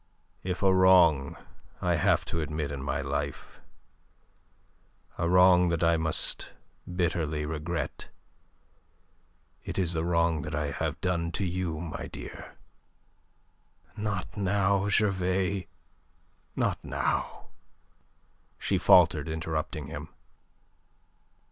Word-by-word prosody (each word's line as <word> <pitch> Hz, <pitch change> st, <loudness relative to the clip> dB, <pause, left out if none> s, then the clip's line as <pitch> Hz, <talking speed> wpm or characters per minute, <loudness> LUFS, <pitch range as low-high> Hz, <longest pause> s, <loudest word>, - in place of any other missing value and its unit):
"If 90 Hz, +1 st, -4 dB
a 95 Hz, -1 st, +5 dB
wrong 90 Hz, -7 st, +5 dB, 0.4 s
I -, -, +1 dB
have -, -, +2 dB
to 85 Hz, -, -2 dB
admit 75 Hz, -1 st, -3 dB
in 70 Hz, -2 st, -5 dB
my 70 Hz, -, -2 dB
life, 70 Hz, 0 st, -4 dB, 1.6 s
a 85 Hz, -, +1 dB
wrong 90 Hz, 0 st, +6 dB
that 85 Hz, 0 st, 0 dB
I 85 Hz, 0 st, +4 dB
must 80 Hz, -1 st, 0 dB, 0.4 s
bitterly 80 Hz, -4 st, -1 dB
regret, 80 Hz, +1 st, -4 dB, 1.5 s
it -, -, -6 dB
is 90 Hz, -3 st, +1 dB
the 80 Hz, -1 st, -1 dB
wrong 85 Hz, -2 st, +1 dB
that 75 Hz, 0 st, -5 dB
I 75 Hz, -1 st, -2 dB
have 80 Hz, +2 st, -3 dB
done 85 Hz, -2 st, -1 dB
to 100 Hz, -, -1 dB
you, 90 Hz, -3 st, -2 dB
my 80 Hz, -2 st, -5 dB
dear..." -, -, -9 dB, 1.4 s
"Not 105 Hz, -3 st, -4 dB
now, 100 Hz, 0 st, +1 dB
Gervais! 95 Hz, -2 st, +1 dB, 0.9 s
Not -, -, -1 dB
now!" -, -, -2 dB, 1.1 s
she -, -, 0 dB
faltered, 80 Hz, -4 st, +5 dB
interrupting 80 Hz, -1 st, -3 dB
him. 75 Hz, +1 st, -7 dB
85 Hz, 105 wpm, -28 LUFS, 75-95 Hz, 1.6 s, wrong